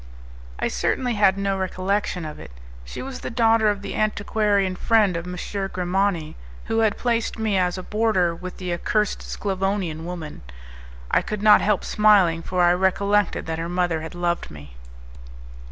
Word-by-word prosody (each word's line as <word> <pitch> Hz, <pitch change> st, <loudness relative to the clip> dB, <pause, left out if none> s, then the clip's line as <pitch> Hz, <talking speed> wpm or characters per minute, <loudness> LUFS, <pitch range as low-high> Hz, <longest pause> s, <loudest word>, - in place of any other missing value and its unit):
I -, -, -1 dB
certainly 240 Hz, -, -1 dB
had 200 Hz, -3 st, +3 dB
no 195 Hz, 0 st, 0 dB
recollection 185 Hz, -1 st, -1 dB
of 150 Hz, -, -7 dB
it. -, -, -10 dB, 0.3 s
She -, -, -7 dB
was 265 Hz, -1 st, -7 dB
the -, -, -5 dB
daughter 225 Hz, -2 st, +3 dB
of 205 Hz, -1 st, -2 dB
the 200 Hz, -, -5 dB
antiquarian 205 Hz, -2 st, 0 dB
friend 210 Hz, -2 st, +2 dB
of 170 Hz, +1 st, -4 dB
M. 180 Hz, 0 st, -6 dB, 0.3 s
Grimani, 180 Hz, -2 st, -1 dB, 0.3 s
who 225 Hz, -, 0 dB
had 220 Hz, -2 st, +2 dB
placed 235 Hz, -2 st, -1 dB
me 220 Hz, -2 st, 0 dB
as 180 Hz, -1 st, +1 dB
a 185 Hz, -, -6 dB
boarder 210 Hz, -6 st, +1 dB
with 180 Hz, +2 st, -8 dB
the 180 Hz, -2 st, -3 dB
accursed 210 Hz, +4 st, 0 dB
Sclavonian 195 Hz, -4 st, -2 dB
woman. 170 Hz, -3 st, -7 dB, 0.7 s
I -, -, +4 dB
could 210 Hz, -1 st, -5 dB
not 210 Hz, -1 st, +7 dB
help 210 Hz, -2 st, +1 dB
smiling, 200 Hz, -6 st, +4 dB
for 180 Hz, +1 st, 0 dB
I 175 Hz, 0 st, +5 dB
recollected 200 Hz, +2 st, +1 dB
that 160 Hz, 0 st, -3 dB
her 165 Hz, +1 st, -3 dB
mother 175 Hz, -2 st, 0 dB
had 160 Hz, +2 st, -8 dB
loved 175 Hz, 0 st, -1 dB
me. 70 Hz, -4 st, -12 dB
190 Hz, 170 wpm, -23 LUFS, 175-210 Hz, 0.7 s, not